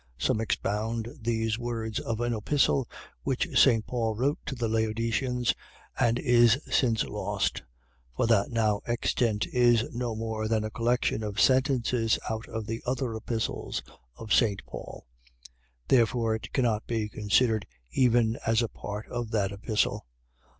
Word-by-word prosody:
Some 85 Hz, -, +1 dB
expound 110 Hz, +1 st, -2 dB
these 115 Hz, -1 st, 0 dB
words 115 Hz, -2 st, -3 dB
of 115 Hz, 0 st, -3 dB
an 120 Hz, 0 st, 0 dB
epistle 135 Hz, +3 st, +1 dB, 0.3 s
which 135 Hz, -2 st, -1 dB
St. 115 Hz, -5 st, +5 dB
Paul 115 Hz, -3 st, -1 dB
wrote 135 Hz, +6 st, 0 dB
to 135 Hz, -, -3 dB
the 120 Hz, -2 st, -1 dB
Laodiceans, 115 Hz, +3 st, 0 dB, 0.5 s
and 120 Hz, 0 st, +3 dB
is 120 Hz, -1 st, +5 dB
since 115 Hz, -6 st, +2 dB
lost, -, -, -2 dB, 0.6 s
for -, -, +2 dB
that 115 Hz, -3 st, +3 dB
now 110 Hz, -3 st, +1 dB
extant 115 Hz, -2 st, 0 dB
is 120 Hz, -2 st, +4 dB
no 120 Hz, -1 st, -2 dB
more 110 Hz, -1 st, -3 dB
than 110 Hz, -1 st, +1 dB
a 110 Hz, -, -4 dB
collection 120 Hz, 0 st, 0 dB
of 105 Hz, 0 st, -4 dB
sentences 130 Hz, -4 st, +3 dB
out 110 Hz, +1 st, -3 dB
of 110 Hz, -1 st, -4 dB
the 115 Hz, +2 st, -4 dB
other 125 Hz, -1 st, -2 dB
epistles 110 Hz, 0 st, -3 dB, 0.3 s
of 110 Hz, +8 st, -3 dB
St. 105 Hz, -5 st, +2 dB
Paul; -, -, -9 dB, 0.8 s
therefore 115 Hz, -2 st, +3 dB
it 110 Hz, -, -5 dB
cannot 115 Hz, -5 st, 0 dB
be 110 Hz, -2 st, -1 dB
considered 110 Hz, +1 st, +1 dB, 0.2 s
even 120 Hz, -, +3 dB
as 115 Hz, +1 st, +2 dB
a 115 Hz, -, -2 dB
part 105 Hz, +1 st, -6 dB
of 120 Hz, -2 st, -3 dB
that 100 Hz, -4 st, 0 dB
epistle. 105 Hz, -, -1 dB
115 Hz, 145 wpm, -28 LUFS, 110-120 Hz, 0.8 s, St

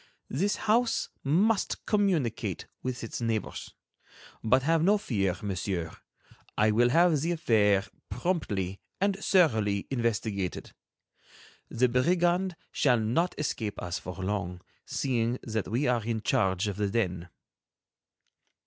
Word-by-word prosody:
This 195 Hz, +10 st, +1 dB
house 230 Hz, +2 st, +1 dB
must 195 Hz, +10 st, +1 dB
communicate 190 Hz, -, 0 dB, 0.2 s
with 130 Hz, -1 st, -4 dB
its 115 Hz, -, -5 dB
neighbors. 115 Hz, -2 st, -3 dB, 0.7 s
But 130 Hz, +4 st, +3 dB
have 165 Hz, +2 st, +3 dB
no 200 Hz, +5 st, +4 dB
fear, 100 Hz, -, -1 dB
Monsieur; 90 Hz, -4 st, -3 dB, 0.6 s
I 110 Hz, +1 st, +4 dB
will 120 Hz, +3 st, +4 dB
have 165 Hz, +1 st, +4 dB
the 165 Hz, +3 st, 0 dB
affair 105 Hz, -, +3 dB, 0.2 s
promptly 100 Hz, -, -2 dB, 0.2 s
and 200 Hz, 0 st, +2 dB
thoroughly 110 Hz, -, +3 dB
investigated. 110 Hz, -6 st, -2 dB, 1.0 s
The 125 Hz, +2 st, +2 dB
brigand 175 Hz, +8 st, +2 dB, 0.2 s
shall 125 Hz, -4 st, +3 dB
not 125 Hz, +12 st, 0 dB
escape 110 Hz, -8 st, -3 dB
us 90 Hz, +2 st, -3 dB
for 90 Hz, -2 st, -7 dB
long, 95 Hz, -2 st, -3 dB, 0.3 s
seeing 120 Hz, -2 st, 0 dB
that 110 Hz, -3 st, -2 dB
we 120 Hz, +8 st, 0 dB
are 120 Hz, -4 st, +1 dB
in 115 Hz, 0 st, -2 dB
charge 95 Hz, 0 st, +1 dB
of 100 Hz, -2 st, -3 dB
the 105 Hz, -1 st, 0 dB
den." 90 Hz, -5 st, -1 dB
115 Hz, 120 wpm, -28 LUFS, 100-165 Hz, 1.0 s, no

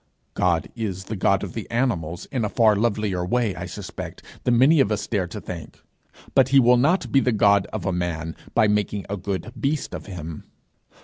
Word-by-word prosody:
God 85 Hz, -3 st, +1 dB
is 100 Hz, -5 st, -3 dB
the 110 Hz, -, -5 dB
God 100 Hz, 0 st, +2 dB
of 95 Hz, -, -6 dB
the 110 Hz, -, -6 dB
animals 90 Hz, -9 st, -1 dB
in 125 Hz, -5 st, -1 dB
a 105 Hz, -, 0 dB
far 110 Hz, -2 st, +4 dB
lovelier 105 Hz, -4 st, 0 dB
way, 110 Hz, +2 st, 0 dB
I -, -, -5 dB
suspect, -, -, -8 dB, 0.2 s
than 120 Hz, -1 st, +3 dB
many 145 Hz, +6 st, +6 dB
of 110 Hz, -6 st, +3 dB
us 105 Hz, -, -1 dB
dare 100 Hz, -5 st, -1 dB
to -, -, -7 dB
think, 85 Hz, -3 st, -8 dB, 0.5 s
but 130 Hz, -1 st, +4 dB
he 135 Hz, 0 st, +6 dB
will 125 Hz, -1 st, +5 dB
not 155 Hz, +10 st, +2 dB
be 135 Hz, -, +5 dB
the 125 Hz, -, +2 dB
God 100 Hz, -2 st, +4 dB
of -, -, -4 dB
a 95 Hz, -, 0 dB
man 80 Hz, -2 st, -3 dB, 0.2 s
by 110 Hz, -2 st, +5 dB
making 105 Hz, -1 st, 0 dB
a -, -, 0 dB
good 100 Hz, +4 st, -4 dB
beast 145 Hz, +1 st, -1 dB
of -, -, -7 dB
him. 85 Hz, -5 st, -7 dB
105 Hz, 205 wpm, -23 LUFS, 90-120 Hz, 0.5 s, many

